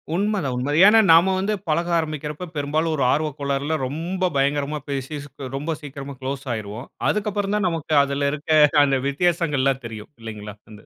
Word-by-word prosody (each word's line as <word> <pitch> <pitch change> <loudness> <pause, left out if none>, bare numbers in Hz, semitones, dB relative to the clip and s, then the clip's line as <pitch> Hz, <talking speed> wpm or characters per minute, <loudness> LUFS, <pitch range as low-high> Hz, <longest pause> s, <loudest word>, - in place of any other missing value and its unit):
உண்மதான், 195 -8 0
உண்மதான். 145 +5 0
ஏன்னா 225 +2 +7
நாம 175 +4 +5
வந்து 205 +3 0
பழக 170 +3 0
ஆரம்பிக்கறப்ப 155 +1 -4
பெரும்பாலும் 155 +3 0
ஒரு 140 - 0
ஆர்வக் 150 -1 -1
கோளாறுல 140 +2 -1
ரொம்ப 175 +6 -2
பயங்கரமா 145 +2 0
பேசி 140 +2 -3
ஸ் - - -13 0.3
ரொம்ப 155 +3 -3
சீக்கிரமா 140 -1 -8
குளோஸ் 135 +1 -4
ஆயிருவோம். 110 +3 -6 0.2
அதுக்கு 210 0 0
அப்பறம் 205 0 -1
தான் 195 -3 +1
நமக்கு 160 -2 -2
அதுல 140 0 0
இருக்க 155 +1 +2 0.2
அந்த 135 -1 +1
வித்தியாசங்கள்லாம் 140 -4 +1
தெரியும் 110 +1 -9
இல்லைங்களா? 105 -2 -8
வந்து 105 -1 -14
145 Hz, 165 wpm, -22 LUFS, 135-165 Hz, 0.3 s, ஏன்னா